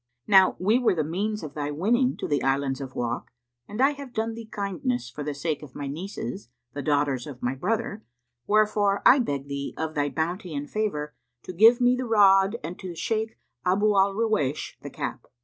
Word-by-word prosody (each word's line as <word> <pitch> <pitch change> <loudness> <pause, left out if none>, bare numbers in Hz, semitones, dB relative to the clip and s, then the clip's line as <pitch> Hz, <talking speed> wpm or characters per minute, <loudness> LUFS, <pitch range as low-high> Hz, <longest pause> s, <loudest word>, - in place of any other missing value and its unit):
Now 190 -2 +6
we 215 +7 +3
were 240 -7 +2
the 155 - +1
means 200 +6 -2
of 155 - -7
thy 145 -1 -3
winning 235 - +1
to - - -4
the 145 - 0
Islands 135 0 0
of 130 -1 -7
Wak, 120 -1 -3 0.4
and 210 - -7
I 270 +2 +5
have 280 -3 -9
done 225 +1 -1
thee 225 0 -9
kindness 155 - -3
for 145 +4 -6
the 145 0 -3
sake 155 +1 -2
of 145 -4 -12
my 145 - -5
nieces, 140 - -6 0.2
the 145 - -4
daughters 140 -3 0
of 135 -4 -10
my 125 +1 0
brother; 210 - -2 0.4
wherefore 210 -1 +2
I 270 - +8
beg 140 - -2
thee, 140 0 -5
of 160 0 -3
thy 145 -1 0
bounty 170 +2 -3
and 145 +1 -4
favour, 150 -7 -2 0.3
to 185 - -7
give 225 +7 +6
me 245 0 +4
the 255 0 -3
rod 195 -3 +5
and 170 +3 -6
the 180 -3 -6
Shaykh 220 +5 -2 0.3
Abu 205 +3 +2
al 195 0 +3
Ruwaysh 210 -11 0
the - - -7
cap." - - -5
180 Hz, 200 wpm, -26 LUFS, 145-215 Hz, 0.4 s, I